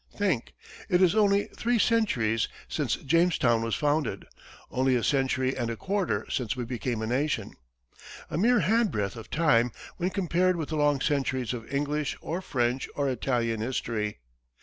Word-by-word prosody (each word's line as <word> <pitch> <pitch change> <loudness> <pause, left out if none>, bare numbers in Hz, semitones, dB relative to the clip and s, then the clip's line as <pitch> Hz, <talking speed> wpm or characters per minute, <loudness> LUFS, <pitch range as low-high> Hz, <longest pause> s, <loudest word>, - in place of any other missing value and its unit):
Think - - 0 0.3
it 180 -2 +4
is 185 -1 +5
only 205 -2 +4
three 240 +1 +1
centuries 130 - +2 0.2
since - - -1
Jamestown 145 -7 +2
was 115 -1 -1
founded; 145 -9 0 0.5
only 130 0 +2
a 120 - 0
century 130 -1 +1
and 120 -3 -2
a 115 - -2
quarter 190 - -1
since 115 -6 -2
we 125 - -3
became 120 -1 -3
a - - -1
nation 125 -3 -1 0.7
a - - -5
mere 225 +6 +4
handbreadth 180 - +1
of 115 - -10
time 125 -7 +3 0.3
when 180 +1 0
compared 185 -1 +1
with 160 -3 -4
the 160 - -2
long 145 -2 +2
centuries 130 -4 0
of 115 -2 -7
English 145 +1 -1
or 170 +4 -4
French 125 -5 -1
or 140 -1 0
Italian 120 -3 0
history. 110 -3 -2
135 Hz, 160 wpm, -28 LUFS, 120-170 Hz, 0.7 s, is